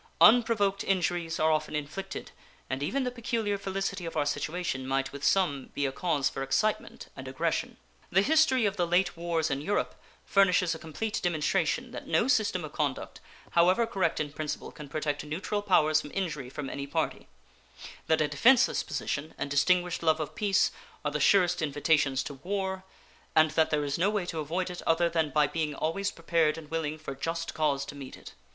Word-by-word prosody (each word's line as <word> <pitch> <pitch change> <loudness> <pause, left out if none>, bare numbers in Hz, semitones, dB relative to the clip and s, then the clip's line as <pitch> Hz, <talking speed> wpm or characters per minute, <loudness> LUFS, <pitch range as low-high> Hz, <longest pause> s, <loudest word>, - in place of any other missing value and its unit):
Unprovoked 215 -4 +5
injuries 175 -3 0
are 160 0 +3
often 155 0 -1
inflicted 155 +7 -5 0.4
and 130 +1 -2
even 265 - 0
the 250 - -1
peculiar 230 -3 -1
felicity 195 -1 -3
of 165 -1 -5
our 145 - +2
situation 145 -2 -2
might 135 0 0
with 140 0 -9
some 145 -9 +2
be 145 - 0
a 135 - 0
cause 145 -1 0
for - - -4
excitement 170 +11 -1
and 130 - -8
aggression. 130 0 -2 0.3
The 190 +3 +3
history 280 -4 +4
of 205 0 0
the 175 -1 +1
late 175 +1 +2
wars 165 -2 -1
in 135 +1 -1
Europe 200 +7 -1 0.3
furnishes 185 -3 +3
a 160 - -7
complete 170 +8 -3
demonstration 175 - 0
that - - -8
no 235 - +2
system 205 - +1
of 150 - -10
conduct, 145 -4 -3 0.3
however 180 +7 +4
correct 185 -7 0
in 145 -2 -3
principle, 155 -1 -4
can 150 -2 -10
protect 150 -1 -2
neutral 180 +7 -3
powers 155 -6 +3
from 150 - -9
injury 150 -9 -3
from 140 +1 -6
any 140 +1 -5
party; 140 - -2 0.8
that 160 -1 +3
a 150 - +3
defenseless 240 - +4
position 150 +2 -4
and 140 - -4
distinguished 180 +5 +2
love 160 -1 +3
of 155 - -4
peace 200 -2 +2 0.3
are 145 - +1
the 150 - -2
surest 180 +2 +4
invitations 145 -2 +1
to - - -6
war, 190 +5 -3 0.5
and 155 -1 +5
that 160 +1 +2
there 150 -1 +1
is 140 +2 -2
no 190 +4 +3
way 205 -3 -1
to 165 -2 -4
avoid 175 +5 -2
it 180 - -7
other 165 +1 +3
than 160 -2 +1
by 150 0 +3
being 150 0 -2
always 195 +7 -1
prepared 165 -2 +1
and 155 -2 -10
willing 155 -2 -2
for 155 -3 -6
just 165 +4 -3
cause 140 -3 0
to 140 - -8
meet 140 -2 -9
it. - - -12
165 Hz, 190 wpm, -29 LUFS, 150-190 Hz, 0.8 s, Unprovoked